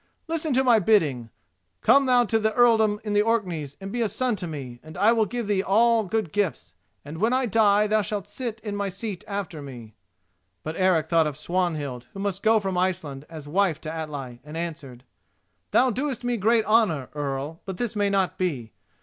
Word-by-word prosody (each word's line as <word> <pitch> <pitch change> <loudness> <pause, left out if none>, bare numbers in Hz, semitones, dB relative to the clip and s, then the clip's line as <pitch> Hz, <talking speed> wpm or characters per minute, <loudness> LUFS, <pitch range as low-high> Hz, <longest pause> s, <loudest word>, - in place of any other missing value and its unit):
Listen 320 -1 -2
to 265 - +3
my 240 -4 +5
bidding: 155 - +2 0.5
come 275 -1 +5
thou 245 -1 +4
to 225 0 +1
the 220 0 0
earldom 220 -4 +4
in 210 -1 -2
Orkneys 180 -11 -1
and 195 0 -7
be 240 +2 -2
a 225 - +1
son 245 +3 0
to 180 - -5
me, 135 -6 -7
and 155 0 -12
I 205 +4 +5
will 225 -2 +2
give 240 +2 -3
thee 200 -2 +1
all 225 +3 +3
good 195 -3 -2
gifts, 160 - -2 0.3
and, 155 +3 -8
when 225 +5 +2
I 260 0 +2
die, 210 -1 +4
thou 215 0 +2
shalt 205 -1 -4
sit 230 +1 -5
in 210 -2 -4
my 200 -1 -2
seat 195 -1 -5
after 195 -6 -4
me." 120 -6 -10 0.7
But 155 +1 -5
Eric 180 -4 +2
thought 165 -1 +3
of 150 -2 -5
Swanhild, 150 -7 -2
who 195 - -8
must 200 -1 -2
go 220 0 +4
from 190 -3 -2
Iceland 160 -7 -2
as 155 -3 -9
wife 175 -1 +1
to 155 0 -5
Atli, 145 -6 -6
and 150 +2 -8
answered: 145 -7 -6 0.7
"Thou 255 - +4
doest 255 +1 -3
me 245 0 0
great 225 +1 +2
honour, 205 - +2
Earl, 145 +2 -4
but 190 -2 -5
this 235 -1 -3
may 205 -1 +1
not 195 -2 0
be. 135 -12 -2
195 Hz, 200 wpm, -25 LUFS, 155-220 Hz, 0.7 s, my